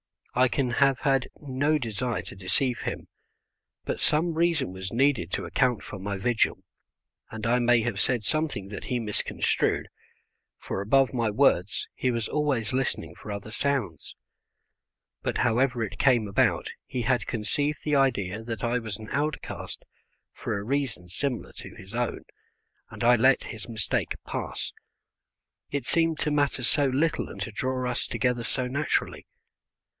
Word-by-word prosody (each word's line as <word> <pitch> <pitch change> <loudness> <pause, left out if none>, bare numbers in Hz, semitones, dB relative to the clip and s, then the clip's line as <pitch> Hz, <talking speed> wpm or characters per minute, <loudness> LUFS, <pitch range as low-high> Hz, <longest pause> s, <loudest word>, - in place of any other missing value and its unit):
I 130 +1 +5
can 130 -1 0
have 135 +1 +3
had 135 -3 +2
no 145 +2 +1
desire 120 -2 -2
to - - -9
deceive 115 +7 0
him, - - -4 0.8
but - - -3
some 165 +3 +2
reason 160 - +2
was 95 0 -6
needed 130 - +2
to - - -1
account 125 -4 +1
for 100 - -7
my 100 +1 -3
vigil, 115 +4 +1 0.7
and 110 -1 -6
I 120 +2 +3
may 120 -1 +4
have 110 -3 -2
said 120 -1 +1
something 145 -7 -1
that 100 - -6
he 125 - 0
misconstrued, 110 -3 0 0.7
for 95 - -4
above 135 +7 +3
my 115 -3 +1
words 105 -5 +2
he 130 - 0
was 115 -2 -1
always 135 -7 0
listening 125 -11 -1
for 105 - -11
other 100 +1 -6
sounds. 120 - -1 1.1
But - - -1
however 125 0 +2
it 105 - -5
came 120 -6 +4
about 100 - +2 0.2
he 130 -2 -2
had 125 +1 +1
conceived 145 +7 -1
the 150 -2 +2
idea 110 -7 +1
that 115 -2 -5
I 120 +1 +2
was 110 -4 -5
an 110 0 -9
outcast 145 +1 -3 0.5
for 110 - -3
a 100 - -4
reason 125 -8 -1
similar 125 +6 -2
to - - -8
his 95 +3 -11
own, 120 0 -1 0.7
and - - -7
I 120 +1 +6
let 130 +4 +5
his 110 0 -7
mistake 110 -4 -1
pass, - - -3 1.0
it 140 -4 -2
seemed 165 +2 +2
to 150 - +1
matter 145 -3 +1
so 145 +3 +3
little 155 +5 +1
and - - -9
to 115 - -3
draw 130 +3 -1
us 120 - -2
together 125 -2 0
so 130 - -1
naturally. 140 +5 -1
125 Hz, 160 wpm, -27 LUFS, 110-135 Hz, 1.1 s, I